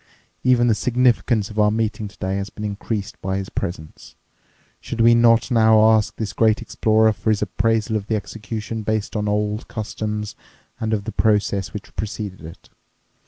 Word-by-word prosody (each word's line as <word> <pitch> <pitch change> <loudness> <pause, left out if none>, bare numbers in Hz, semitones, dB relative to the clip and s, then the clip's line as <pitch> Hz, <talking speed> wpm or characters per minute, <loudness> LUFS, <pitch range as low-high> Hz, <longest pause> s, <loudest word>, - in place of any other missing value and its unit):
Even 125 -2 +4
the 115 - +4
significance 120 -2 +1
of 105 - -4
our 105 0 +5
meeting 110 -1 -1
today 95 -1 -4
has 100 0 -4
been 105 - -9
increased 105 0 -4
by 95 0 -2
his 95 0 -5
presence. 80 -3 -6 0.6
Should 120 - -7
we 115 +1 +6
not 115 0 +4
now 110 -2 +5
ask 110 -1 +1
this 110 -3 -4
great 110 -1 +3
explorer 110 0 +2
for 110 - -3
his 105 -1 +2
appraisal 110 +2 0
of 105 -2 -3
the 110 - 0
execution 110 +1 -5
based 110 0 -2
on 105 -1 -1
old 105 +1 -1
customs 105 -2 -4 0.4
and 110 0 -2
of 105 -2 0
the 110 - -5
process 105 -4 +1
which 105 - -9
preceded 100 -1 -5
it? 80 +1 -12
110 Hz, 170 wpm, -21 LUFS, 105-110 Hz, 0.6 s, we